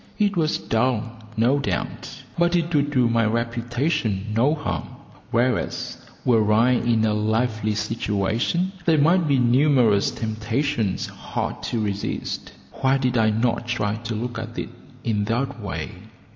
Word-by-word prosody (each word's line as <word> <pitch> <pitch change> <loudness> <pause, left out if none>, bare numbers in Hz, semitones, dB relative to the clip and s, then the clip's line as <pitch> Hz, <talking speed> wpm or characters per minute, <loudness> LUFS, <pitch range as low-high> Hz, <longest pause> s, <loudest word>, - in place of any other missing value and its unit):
It 205 -2 +2
was 160 -2 +1
dull, 115 0 0 0.3
no 125 +6 +3
doubt, 140 - -4
but 175 +1 +2
it 170 0 0
would 145 -1 +2
do 130 -4 +3
my 115 0 +2
reputation 115 - -1
no 135 +7 +3
harm, 90 - -3 0.4
whereas, 120 +1 0 0.3
were 110 -4 +3
I 115 +4 +4
in 120 -2 +2
a 110 - +2
lively 110 0 0
situation, 110 - 0
there 165 -2 +4
might 165 +3 +4
be 140 -2 +3
numerous 125 -4 +4
temptations 110 +1 -1
hard - - -4
to 115 - -1
resist. 100 -2 -3 0.2
Why 135 0 +2
did 130 -2 0
I 110 -2 +4
not 115 +2 0
try 105 -4 0
to 115 0 -4
look 120 +1 -3
at 115 +1 -7
it - - -3 0.3
in 105 -3 0
that 120 +2 -2
way? 95 -4 -4
115 Hz, 145 wpm, -23 LUFS, 110-135 Hz, 0.4 s, I